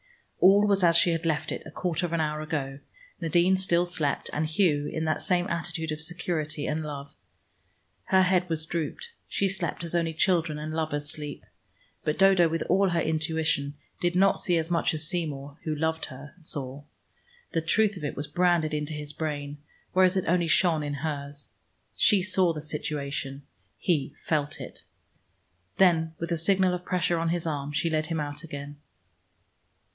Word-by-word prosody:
All 200 +3 +6
was 200 -2 +2
as 170 -1 +6
she 170 - +4
had 165 0 -1
left 155 -2 0
it - - -4
a - - -10
quarter 180 -2 -2
of 170 - -7
an 170 - +1
hour 155 -1 -1
ago; 145 -3 -3 0.4
Nadine 170 +3 +3
still 180 -2 +2
slept 160 -5 -2
and 155 +1 0
Hugh, 155 -3 +2
in 160 0 -3
that 155 - 0
same 180 -1 +2
attitude 165 -1 -3
of 155 0 -3
security 160 -3 -2
and 155 +1 -1
love. 145 -2 -6 0.9
Her 190 0 +4
head 180 -1 +2
was 160 -1 -1
drooped; 170 - -4 0.2
she 200 - +1
slept 180 -3 -2
as 170 - -3
only 165 -2 0
children 165 -3 +2
and 155 +1 -5
lovers 155 -2 -2
sleep. 145 0 -6 0.6
But 150 - -1
Dodo 190 -3 +5
with 165 0 -1
all 195 +2 +3
her 170 -1 +1
intuition 160 -3 0 0.2
did 175 0 0
not 195 +1 +4
see 175 -2 +2
as 165 +1 -2
much 170 -1 +1
as 155 0 +4
Seymour, 150 -5 -3
who 155 -1 -1
loved 160 +1 -1
her, 135 +3 -11
saw. 145 -3 -4 0.7
The 165 - 0
truth 210 +6 +2
of 180 - -8
it 145 - -3
was 145 - -3
branded 170 0 +2
into 150 +1 -2
his 150 0 -6
brain, 145 -2 -4 0.3
whereas 185 +1 +4
it 190 - 0
only 175 0 +2
shone 160 0 +3
in 145 -1 -3
hers. 145 -1 -5 0.5
She 200 -4 +4
saw 185 -1 +3
the 155 -2 -5
situation: 140 -2 -3 0.3
he 145 -5 0
felt 150 -2 0
it. - - -9 0.9
Then 165 -4 +3
with 170 +1 -4
a 170 - +1
signal 185 +2 +3
of 180 0 -4
pressure 175 -2 0
on 165 0 0
his 170 0 -1
arm, 145 -3 -2
she 165 +3 0
led 155 -1 0
him 165 -2 -2
out 145 +1 -4
again. 145 -2 -7
160 Hz, 180 wpm, -27 LUFS, 150-175 Hz, 0.9 s, All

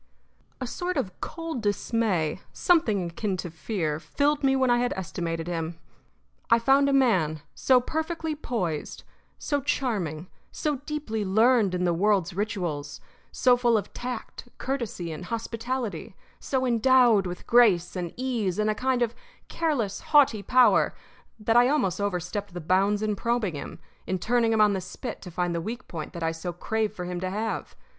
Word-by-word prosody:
A 255 - -3
sort 355 +8 -3
of 195 -9 -3
cold 330 -7 -4
dismay 205 -6 0
something 215 - +2
akin 195 +2 -2
to 175 -2 -5
fear 160 -3 -2
filled 285 - 0
me 270 0 +4
when 260 -2 +3
I 240 - +4
had 245 0 0
estimated 165 -3 -4
him. 165 -1 -3 0.7
I 230 - +6
found 270 +4 +4
a - - +2
man 185 - +2
so 255 -1 +4
perfectly 320 +4 -3
poised, 200 - -3 0.3
so 290 -1 -1
charming, 185 - -2 0.2
so 300 -2 -1
deeply 280 -8 -2
learned 215 0 +3
in 180 - -1
the 175 -1 +2
world's 190 0 +2
rituals, 175 -8 -3 0.3
so 250 -1 +4
full 240 -2 +3
of 205 -1 -4
tact, 250 0 -6
courtesy, 235 -10 -3
and 160 +3 -7
hospitality, 230 -2 -4 0.2
so 260 -1 -1
endowed 240 -4 +4
with 180 0 -7
grace 210 -8 +4
and 175 -2 -3
ease 235 -8 -1
and 215 0 +2
a - - 0
kind 255 +2 +1
of 230 -1 -1 0.4
careless, 255 -12 -1
haughty 275 -8 +4
power 245 -1 +4 0.4
that 225 +2 +1
I 245 +1 +6
almost 205 - +1
overstepped 195 0 -3
the - - -3
bounds 195 +5 +2
in 210 -1 0
probing 230 -3 0
him, 145 - -7 0.3
in 185 - 0
turning 230 +4 +1
him 220 -1 +3
on 210 -1 +5
the 190 - -2
spit 200 +7 -7
to 180 - -8
find 175 0 -1
the 170 - -2
weak 235 +8 -6
point 160 -1 -6
that 170 -2 -5
I 165 - +1
so 165 +2 -5
craved 215 +4 -2
for 180 - -5
him 180 0 -4
to 185 +1 -2
have. 215 +3 -3
215 Hz, 170 wpm, -26 LUFS, 180-250 Hz, 0.7 s, I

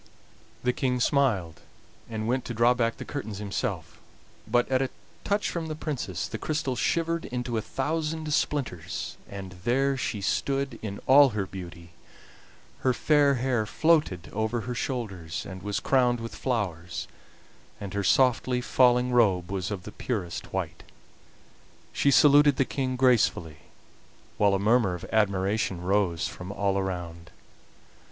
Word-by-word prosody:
The 125 0 +2
King 125 -1 0
smiled, 115 - +1 0.5
and 110 -1 -3
went 125 +1 0
to 120 - -5
draw 120 +2 +5
back 115 -2 0
the - - -7
curtains 110 -8 -5
himself, 100 -1 -4 0.5
but 120 +2 +2
at 130 0 +1
a 135 - 0 0.3
touch 205 +1 0
from 165 -2 -3
the 155 - -4
Princess 130 - -3
the - - -6
crystal 150 -4 -2
shivered 165 +4 0
into 125 -1 -3
a 110 - 0
thousand 155 +4 -2
splinters, 90 - -2
and 100 -2 -7
there 135 +3 +2
she 120 -5 -3
stood 135 +5 -1
in 100 -2 -5
all 140 +1 +7
her 100 - 0
beauty; 85 -3 -9 0.9
her 130 - +2
fair 145 0 +3
hair 120 -3 0
floated 150 - +2
over 110 +2 -1
her 125 +3 -4
shoulders 100 - -4
and 95 -1 -8
was 105 +1 -2
crowned 125 -3 +2
with 115 0 -6
flowers, 90 -9 -3 0.7
and 100 -1 -6
her 100 0 -1
softly 125 +1 +3
falling 125 0 +3
robe 95 -7 +3
was 95 -1 -2
of 100 -4 -5
the 105 - -8
purest 95 -11 -4
white. - - -3 1.1
She 140 - +2
saluted 145 0 +6
the 135 0 +2
King 130 -1 -2
gracefully, 120 -11 +2 0.8
while 100 -1 +4
a - - +2
murmur 105 -2 +3
of 90 - -8
admiration 100 -2 +1
rose 90 -2 +1
from 90 +1 -8
all 100 -1 0
around. 85 -3 -5
115 Hz, 145 wpm, -27 LUFS, 95-135 Hz, 1.1 s, all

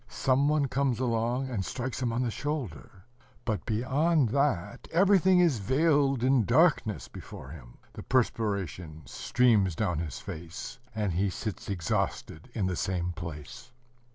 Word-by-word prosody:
Some 135 +2 +1
one 150 -2 +2
comes 135 -2 0
along, 120 +1 0
and 110 -7 -2
strikes 130 +5 -4
him 120 -2 0
on 120 +2 0
the 120 - -1
shoulder;... 120 - -5 0.4
but 105 -9 -2
beyond 135 +5 +2
that 125 -8 0
everything 185 +1 +5
is 165 -10 +3
veiled 135 +2 +2
in 130 -2 +4
darkness 95 - +2
before 65 - -10
him. 65 -6 -12 0.2
The - - -8
perspiration 100 - -1
streams 110 -8 +2
down 90 -6 0
his 80 -4 -4
face, 85 +9 -7 0.2
and 105 -4 -1
he 95 +4 +1
sits 100 0 -5
exhausted 85 +1 -2
in 105 -5 0
the 90 -1 -1
same 90 0 -1
place. 85 +7 -8
115 Hz, 145 wpm, -29 LUFS, 90-135 Hz, 0.4 s, everything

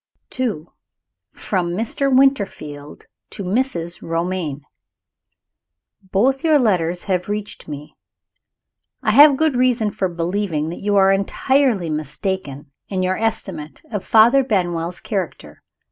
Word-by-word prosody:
II. 210 -12 -1 0.7
From 175 -3 -2
Mr. 235 +6 -1
Winterfield 200 - 0 0.2
to 200 - -6
Mrs. 180 -5 -2
Romayne. 165 -3 -3 1.4
Both 220 +8 +1
your 315 -2 +5
letters 180 - +1
have 185 -1 -2
reached 210 0 -5
me. 150 0 -8 1.1
I - - +2
have 290 -1 +8
good 315 -3 +1
reason 245 -4 +2
for 190 -2 -1
believing 170 -2 -2
that 170 - -7
you 205 0 0
are 195 -1 +5
entirely 200 - +1
mistaken 150 -1 -4 0.2
in 185 -2 -1
your 185 +1 +1
estimate 175 -9 -3
of 205 -4 -3
Father 235 +5 +5
Benwell's 175 -6 -1
character. 195 -6 -5
190 Hz, 115 wpm, -20 LUFS, 170-230 Hz, 1.4 s, have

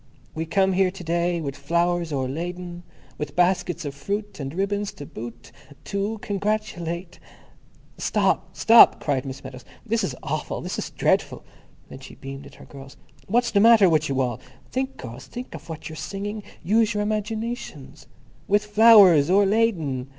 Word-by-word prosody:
We 160 +1 -4
come 190 +2 +2
here 190 0 +3
To 185 -1 -10
day 170 +1 0
with 140 -3 -4
Flowers 170 +3 0
o'erladen, 175 +6 -4 0.4
With 150 -1 -5
Baskets 175 -2 +1
of 140 - -4
Fruit 205 +8 -4
and 135 -1 -4
Ribbons 200 +4 -2
to 145 - -9
boot, 120 -1 -9 0.3
To 200 - -5
oo 210 +3 -2
Congratulate... 195 -5 -3 0.8
"Stop! - - 0
Stop!" 230 0 +7
cried 140 -3 -1
Miss 135 0 -7
Meadows. 130 -1 -9 0.2
"This 225 0 0
is 125 - -2
awful. - - -3
This - - -4
is - - -4
dreadful." - - 0 0.5
And 130 - -10
she - - -11
beamed 135 +1 -9
at - - -16
her - - -14
girls. 135 -1 -12 0.3
"What's 240 +3 +1
the 200 - +3
matter 225 -2 +7
with 155 -3 +2
you 135 -1 0
all? 120 -3 -2 0.3
Think, 265 +1 -3
girls, 125 +2 -9
think 245 +1 -8
of - - -10
what 160 -1 -7
you're 160 - -8
singing. 205 +6 -5 0.2
Use 215 +4 +2
your 210 - 0
imaginations. 215 - -4 0.4
_With 205 +1 +4
Flowers 210 -8 +7
o'erladen. 190 - +2
175 Hz, 165 wpm, -24 LUFS, 145-210 Hz, 0.8 s, Stop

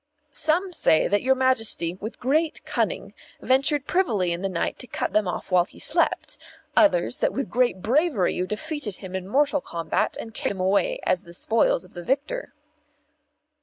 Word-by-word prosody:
"Some 340 +6 0
say 160 - +3
that 205 +2 +2
your 265 +1 +3
Majesty, 225 -10 +1
with 205 +5 -8
great 305 +5 0
cunning, - - -2 0.3
ventured 275 +2 +2
privily 215 - +1
in 170 - -4
the 195 - -1
night 170 -3 -2
and 250 - -14
cut - - -2
them 210 -2 +2
off 180 - -4
while 180 -1 +4
he - - -17
slept; - - 0 0.4
others, 250 - +4
that - - +1
with 275 - -3
great 240 -7 +1
bravery 265 - +2
you 180 - -2
defeated 240 - -3
him 190 -1 -8
in 190 0 -4
mortal 285 +5 +2
combat 165 -7 -2
and 225 - -7
carried - - -2
them - - -9
away 200 - +1
as 185 -1 +1
the 170 0 -10
spoils - - +1
of - - -19
the 175 - -7
victor." 285 - -2
230 Hz, 180 wpm, -25 LUFS, 185-295 Hz, 0.4 s, while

